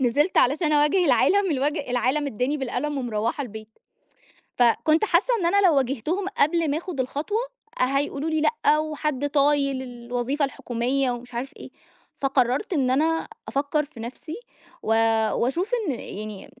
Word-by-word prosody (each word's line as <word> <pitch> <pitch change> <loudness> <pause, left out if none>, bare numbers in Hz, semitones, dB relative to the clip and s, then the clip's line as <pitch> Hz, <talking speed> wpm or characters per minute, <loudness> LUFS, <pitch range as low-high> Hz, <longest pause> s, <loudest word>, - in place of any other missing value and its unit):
نزَلِت 295 +9 +2
علشان 300 +4 +3
أواجِه 300 +5 +3
العالَم، 400 +1 +3
الوج 295 +2 0
العالَم 255 +2 0
أدَّاني 265 +3 -1
بالقلَم 285 +2 -2
ومرَوِّحة 235 +2 -2
البيت. 220 -3 -8 0.9
فكنت 310 - +3
حاسَّة 400 +7 +2
إن 355 - -1
أنا 390 +2 +4
لو 325 - +4
واجهتهم 275 - -1
قبل 320 0 +2
ما 300 - 0
آخُد 335 -4 -6
الخطوة، 300 - -1 0.4
هيقولوا 280 +3 0
لي: 315 -1 0
"لأ، 315 -5 +2
وحد 300 -2 -2
طايِل 280 -2 +2
الوظيفة 245 +3 -2
الحكومية 255 0 -1
ومش 245 0 -7
عارف 250 +3 -4
إيه." - - -10 0.5
فقرَّرت 270 - +1
إن 270 -5 +1
أنا 320 +4 +1 0.2
أفكر 285 +2 0
في 275 -6 -15
نفسي، 260 +8 -7 0.5
و - - -8 0.5
وأشوف 340 - -1 0.2
إن - - +2
يعني 215 -3 -7
280 Hz, 145 wpm, -24 LUFS, 250-315 Hz, 0.9 s, أنا